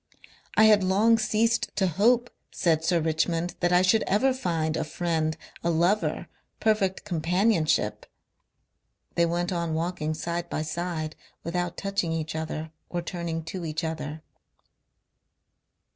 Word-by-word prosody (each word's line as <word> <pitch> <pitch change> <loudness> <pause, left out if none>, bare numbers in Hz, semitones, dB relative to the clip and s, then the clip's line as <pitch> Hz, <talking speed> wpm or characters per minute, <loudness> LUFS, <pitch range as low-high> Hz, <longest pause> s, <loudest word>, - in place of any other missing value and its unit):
"I - - +7
had 210 -2 +6
long 215 +5 +4
ceased 225 +2 +1
to 195 - +2
hope," 230 +8 +3 0.2
said 160 -3 +1
Sir 170 +1 +2
Richmond, 165 +2 0
"that 175 0 +1
I 180 +1 +5
should 220 +4 +4
ever 260 +7 +3
find 165 -10 -1
a - - 0
friend... 160 -1 -1 0.3
a 170 - +1
lover... 175 +6 +1 0.3
perfect 210 -4 +1
companionship...." 180 0 +1 1.1
They 170 0 +3
went 175 +2 -1
on 170 -3 -1
walking 160 -2 -2
side 170 +2 -3
by 155 - -2
side, 155 0 -3 0.3
without 175 +1 -2
touching 195 -4 -1
each 160 -1 -2
other 160 0 -4 0.2
or 175 -1 -3
turning 170 -2 -4
to 175 +2 -6
each 155 +1 -3
other. 155 -1 -4
170 Hz, 135 wpm, -27 LUFS, 160-195 Hz, 1.1 s, I